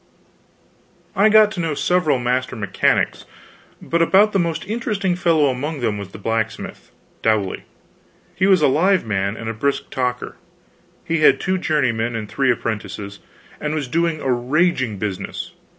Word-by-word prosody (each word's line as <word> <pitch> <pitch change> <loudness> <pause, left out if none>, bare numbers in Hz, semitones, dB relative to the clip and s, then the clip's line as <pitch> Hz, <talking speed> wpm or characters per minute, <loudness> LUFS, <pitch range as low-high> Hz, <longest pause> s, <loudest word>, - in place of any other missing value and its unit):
I 200 +3 +5
got 215 -1 +6
to 195 - -6
know 165 -3 -1
several 175 -3 +2
master 125 +1 -1
mechanics, 105 -3 0 0.5
but 170 0 -1
about 200 +5 +4
the 195 - +2
most 170 -2 -1
interesting 205 -3 -1
fellow 165 -4 +2
among 140 +3 -4
them 110 -3 -1
was 100 -2 -7
the - - -11
blacksmith, 110 +1 -3 0.3
Dowley. 110 -4 0 0.7
He 190 - +1
was 185 -5 +4
a - - +6
live 180 +6 +2
man 100 0 -1
and 115 - -7
a 115 - -2
brisk 140 +6 -2
talker, 125 -1 -3 0.7
and 165 - +1
had 135 -3 +5
two 185 0 -1
journeymen 120 -8 0
and 110 -2 -4
three 135 +5 0
apprentices, 100 -3 -4 0.4
and 150 +1 -2
was 145 -4 -2
doing 165 +3 0
a 130 - 0
raging 130 - 0
business. 100 -1 -5
135 Hz, 155 wpm, -20 LUFS, 115-175 Hz, 0.7 s, got